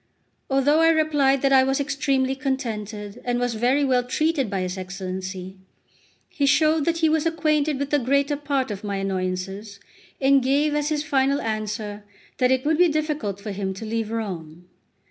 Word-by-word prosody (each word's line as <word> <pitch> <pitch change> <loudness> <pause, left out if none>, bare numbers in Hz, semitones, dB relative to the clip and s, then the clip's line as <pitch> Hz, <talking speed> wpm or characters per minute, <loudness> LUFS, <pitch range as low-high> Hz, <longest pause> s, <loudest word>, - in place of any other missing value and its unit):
Although 275 +3 +3
I 325 0 +5
replied 295 -4 +2
that 275 0 +3
I 260 -1 +7
was 270 +1 0
extremely 275 -2 0
contented 225 -6 -4
and 245 0 -1
was 245 -1 0
very 250 +6 +2
well 255 -2 +2
treated 290 0 0
by 195 -1 -2
his 185 0 -3
Excellency, 185 0 -6 0.7
he 285 -6 -1
showed 310 +1 +3
that 335 0 +1
he 325 -1 +3
was 315 0 +2
acquainted 305 -3 +1
with 280 +1 -3
the 295 - +3
greater 280 +3 +1
part 280 -4 -1
of 200 0 -6
my 200 -1 -3
annoyances, 195 +1 -3 0.4
and 275 0 +4
gave 285 +4 +2
as 295 0 0
his 300 -1 -1
final 275 -2 +1
answer 215 -1 -4 0.4
that 250 -1 +3
it 260 +1 +1
would 315 +1 +2
be 355 - +6
difficult 300 - -2
for 210 +1 -6
him 195 -1 -3
to 220 - -7
leave 225 0 -2
Rome. 180 -7 -5
260 Hz, 180 wpm, -23 LUFS, 205-290 Hz, 0.7 s, I